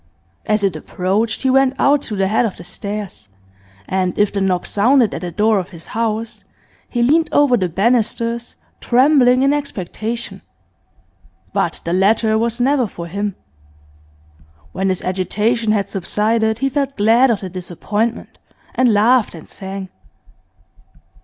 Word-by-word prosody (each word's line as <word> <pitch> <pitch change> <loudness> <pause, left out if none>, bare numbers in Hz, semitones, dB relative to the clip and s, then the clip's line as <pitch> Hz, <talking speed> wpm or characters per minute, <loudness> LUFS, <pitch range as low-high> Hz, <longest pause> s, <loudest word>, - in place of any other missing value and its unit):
As 210 -1 +1
it 195 -4 +1
approached 195 - -2
he 260 - +3
went 270 0 +3
out 285 +1 +3
to 215 - -3
the 195 -1 +1
head 220 +4 +2
of 220 -5 -2
the - - -10
stairs, 200 - -7 0.6
and 185 -1 -1
if 205 -1 +2
the 200 - -1
knock 185 -2 0
sounded 235 +2 +3
at - - -5
the 180 - -4
door 210 +3 +2
of 185 - -6
his 165 -3 -10
house, 225 0 -2 0.5
he 240 -1 0
leaned 315 +6 +3
over 290 -4 +4
the 185 -6 0
banisters, 230 +4 0 0.2
trembling 255 0 +4
in 275 +1 +3
expectation. 230 -4 -4 1.1
But - - -1
the 170 - -1
letter 215 +4 +3
was 230 +2 0
never 260 -1 +2
for 170 -3 -8
him. 200 +3 -3 1.4
When 190 - -1
his 185 - -2
agitation 215 +5 0
had 200 -2 0
subsided 220 +3 0
he 270 +3 0
felt 280 0 -2
glad 230 +5 +4
of 225 -4 0
the 190 - -5
disappointment, 205 +6 -3 0.3
and 250 -2 +3
laughed 220 +1 +3
and 160 - -12
sang. 190 -1 -7
215 Hz, 150 wpm, -18 LUFS, 195-245 Hz, 1.4 s, over